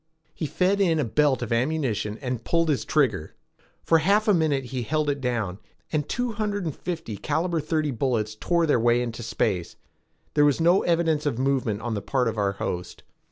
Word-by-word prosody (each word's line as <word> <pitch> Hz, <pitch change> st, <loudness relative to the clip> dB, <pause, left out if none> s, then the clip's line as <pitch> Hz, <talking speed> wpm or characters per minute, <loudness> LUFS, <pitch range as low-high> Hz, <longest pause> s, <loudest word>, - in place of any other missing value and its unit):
He 155 Hz, -, -3 dB
fed 190 Hz, +6 st, +1 dB
in 170 Hz, -4 st, +3 dB
a 150 Hz, -, +1 dB
belt 130 Hz, +2 st, +2 dB
of 115 Hz, 0 st, -2 dB
ammunition 115 Hz, -5 st, -1 dB
and 125 Hz, -2 st, -3 dB
pulled 165 Hz, -1 st, +1 dB
his 145 Hz, -, 0 dB
trigger. 125 Hz, -, 0 dB, 0.5 s
For 165 Hz, -, +4 dB
half 200 Hz, +7 st, +2 dB
a 210 Hz, -, +5 dB
minute 155 Hz, -6 st, +1 dB
he 125 Hz, 0 st, -4 dB
held 150 Hz, +4 st, 0 dB
it 140 Hz, -1 st, -4 dB
down, 115 Hz, -7 st, -2 dB, 0.3 s
and 150 Hz, -2 st, -1 dB
two 245 Hz, 0 st, -1 dB
hundred 205 Hz, -3 st, -2 dB
and 155 Hz, -, -3 dB
fifty 165 Hz, -11 st, -5 dB
caliber 170 Hz, -, -1 dB
thirty 155 Hz, -1 st, -1 dB
bullets 115 Hz, -4 st, -1 dB
tore 170 Hz, +9 st, +1 dB
their 145 Hz, -6 st, +3 dB
way 120 Hz, +1 st, +3 dB
into 120 Hz, 0 st, -5 dB
space. 100 Hz, -6 st, -1 dB, 0.6 s
There 145 Hz, -, +4 dB
was 145 Hz, 0 st, +3 dB
no 175 Hz, +4 st, +4 dB
evidence 165 Hz, -3 st, +1 dB
of 135 Hz, -, -1 dB
movement 130 Hz, -5 st, 0 dB
on 120 Hz, -1 st, -2 dB
the 105 Hz, -, -2 dB
part 130 Hz, +1 st, 0 dB
of 110 Hz, -1 st, -2 dB
our 100 Hz, -1 st, +1 dB
host. 90 Hz, -2 st, -5 dB
140 Hz, 200 wpm, -25 LUFS, 115-165 Hz, 0.6 s, a